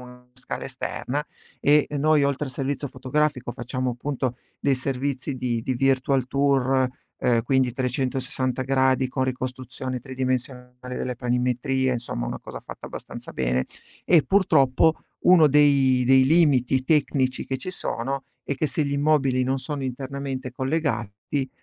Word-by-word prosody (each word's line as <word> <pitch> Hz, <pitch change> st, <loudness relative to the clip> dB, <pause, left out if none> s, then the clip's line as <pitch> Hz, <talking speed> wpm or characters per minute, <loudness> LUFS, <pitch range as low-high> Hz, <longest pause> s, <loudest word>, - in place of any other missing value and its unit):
una 125 Hz, 0 st, -14 dB
scala 130 Hz, 0 st, -6 dB
esterna, 145 Hz, +4 st, -3 dB, 0.4 s
e 150 Hz, +1 st, +4 dB
noi 150 Hz, -1 st, +4 dB
oltre 140 Hz, +1 st, 0 dB
al -, -, -6 dB
servizio 140 Hz, +2 st, -3 dB
fotografico 130 Hz, -1 st, -1 dB
facciamo 130 Hz, 0 st, -3 dB
appunto 125 Hz, 0 st, -3 dB, 0.2 s
dei 140 Hz, -1 st, +2 dB
servizi 135 Hz, +1 st, -2 dB
di 120 Hz, -2 st, -1 dB
di 130 Hz, -, -1 dB
virtual 135 Hz, 0 st, +2 dB
tour, 135 Hz, -1 st, +2 dB, 0.3 s
ehm, 115 Hz, -2 st, +2 dB
quindi 130 Hz, -1 st, +2 dB
360 130 Hz, 0 st, -1 dB
gradi 130 Hz, 0 st, +2 dB
con 130 Hz, 0 st, -1 dB
ricostruzione 130 Hz, 0 st, -4 dB
tridimensionale 125 Hz, -1 st, -4 dB
delle 125 Hz, -, -3 dB
planimetrie, 125 Hz, +2 st, 0 dB
insomma, 115 Hz, -, -3 dB
una -, -, -5 dB
cosa -, -, -8 dB
fatta -, -, -9 dB
abbastanza -, -, -8 dB
bene, 65 Hz, 0 st, 0 dB, 0.4 s
e 165 Hz, -4 st, +5 dB
purtroppo 160 Hz, -5 st, +4 dB, 0.3 s
uno 175 Hz, -3 st, +8 dB
dei 140 Hz, -3 st, +4 dB
dei 130 Hz, 0 st, +6 dB
limiti 135 Hz, -4 st, +3 dB
tecnici 135 Hz, -3 st, +1 dB
che 135 Hz, -, -2 dB
ci 185 Hz, -, -5 dB
sono 135 Hz, -5 st, -3 dB, 0.2 s
è 140 Hz, -, -1 dB
che 155 Hz, -, 0 dB
se 145 Hz, +3 st, 0 dB
gli 140 Hz, -, -2 dB
immobili 140 Hz, -3 st, +2 dB
non 135 Hz, +1 st, 0 dB
sono 145 Hz, 0 st, -5 dB
internamente 130 Hz, 0 st, -4 dB
collegati, 130 Hz, -3 st, -2 dB
130 Hz, 140 wpm, -24 LUFS, 125-140 Hz, 0.4 s, uno